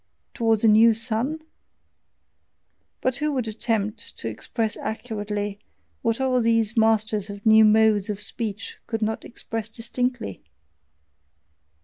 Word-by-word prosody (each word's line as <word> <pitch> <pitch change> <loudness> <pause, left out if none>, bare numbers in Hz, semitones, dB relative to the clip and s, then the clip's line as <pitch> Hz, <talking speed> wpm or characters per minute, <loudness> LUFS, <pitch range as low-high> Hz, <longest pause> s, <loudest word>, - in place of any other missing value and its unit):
towards 225 -3 +1
a - - +6
new 220 +1 +6
sun? 235 +7 -1 1.6
But 255 0 0
who 300 +1 0
would 255 -4 -1
attempt 215 -1 -2
to - - -5
express 215 - -3
accurately 210 -3 -4 0.4
what 230 +1 0
all 255 -2 +2
these 230 -1 +2
masters 220 -2 +2
of 200 +1 -9
new 220 0 +7
modes 215 -1 +4
of 205 -1 -3
speech 215 0 -5
could 225 -1 -2
not 220 +1 -2
express 225 -2 -5
distinctly? 240 - -3
220 Hz, 120 wpm, -24 LUFS, 210-230 Hz, 1.6 s, new